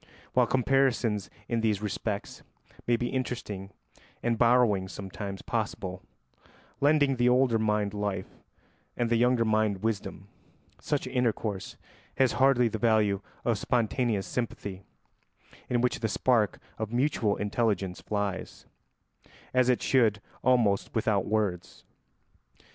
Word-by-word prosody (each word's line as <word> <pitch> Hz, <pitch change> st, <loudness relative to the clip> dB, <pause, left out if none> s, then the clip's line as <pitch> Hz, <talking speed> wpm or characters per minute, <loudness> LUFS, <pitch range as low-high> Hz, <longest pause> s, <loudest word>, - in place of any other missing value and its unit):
While 125 Hz, -2 st, +4 dB
comparisons 125 Hz, -6 st, +1 dB, 0.2 s
in 115 Hz, -1 st, 0 dB
these 110 Hz, -3 st, +1 dB
respects 105 Hz, 0 st, -4 dB, 0.5 s
may 120 Hz, -, +4 dB
be 120 Hz, +1 st, -2 dB
interesting 105 Hz, -7 st, -4 dB, 0.5 s
and 120 Hz, -1 st, +1 dB
borrowings 115 Hz, -5 st, +3 dB
sometimes 95 Hz, +1 st, -6 dB
possible, 95 Hz, -5 st, -3 dB, 0.8 s
lending 145 Hz, -2 st, +3 dB
the 120 Hz, +1 st, +4 dB
older 125 Hz, -2 st, +3 dB
mind 105 Hz, -2 st, 0 dB
life 105 Hz, -1 st, -4 dB, 0.6 s
and 120 Hz, -1 st, 0 dB
the -, -, +4 dB
younger 120 Hz, 0 st, +3 dB
mind 110 Hz, -2 st, +1 dB
wisdom, 110 Hz, -3 st, -3 dB, 0.5 s
such 145 Hz, -3 st, -1 dB
intercourse 115 Hz, -6 st, -2 dB, 0.4 s
has 130 Hz, -3 st, +4 dB
hardly 130 Hz, -2 st, +4 dB
the 110 Hz, -1 st, -4 dB
value 105 Hz, -4 st, +2 dB, 0.2 s
of 115 Hz, -4 st, +1 dB
spontaneous 115 Hz, -3 st, 0 dB
sympathy, 100 Hz, -5 st, -4 dB, 0.9 s
in 120 Hz, -1 st, +1 dB
which 125 Hz, -, 0 dB
the 110 Hz, -, 0 dB
spark 110 Hz, -2 st, +2 dB, 0.2 s
of 110 Hz, -1 st, -3 dB
mutual 120 Hz, -4 st, +1 dB
intelligence 105 Hz, -3 st, -1 dB
flies, 100 Hz, -3 st, -3 dB, 0.9 s
as 130 Hz, 0 st, +3 dB
it 125 Hz, -, +2 dB
should, 115 Hz, -6 st, +3 dB, 0.2 s
almost 115 Hz, -6 st, +2 dB
without 110 Hz, -3 st, +1 dB
words. 100 Hz, -4 st, -2 dB
110 Hz, 120 wpm, -28 LUFS, 100-125 Hz, 0.9 s, While